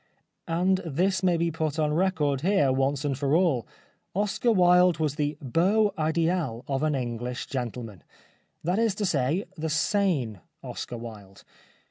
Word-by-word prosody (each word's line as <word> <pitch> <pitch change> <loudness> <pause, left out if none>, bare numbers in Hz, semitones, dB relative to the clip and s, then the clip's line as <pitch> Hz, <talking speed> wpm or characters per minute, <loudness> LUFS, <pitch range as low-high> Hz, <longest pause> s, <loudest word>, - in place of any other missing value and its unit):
And 180 +3 +2
this 175 +3 0
may 180 -2 +2
be 170 0 0
put 155 -1 -2
on 150 -1 +1
record 155 -6 +1
here 170 -6 +3
once 135 +2 0
and 140 -2 0
for 140 +2 +1
all. 160 -10 +2 0.5
Oscar 210 +4 +1
Wilde 180 -3 +5
was 155 -3 0
the 150 -1 -2
heau 190 - +2
idMl 160 -5 0
of 135 -1 -1
an 155 -1 +1
English 125 0 -3
gentleman. 120 - -5 0.6
That 180 +5 0
is 225 -4 +2
to 205 - -1
say 155 +3 0
the 160 +1 -2
sane 155 - 0 0.2
Oscar 120 - -6
Wilde. 105 -4 -10
155 Hz, 150 wpm, -27 LUFS, 130-180 Hz, 0.6 s, Wilde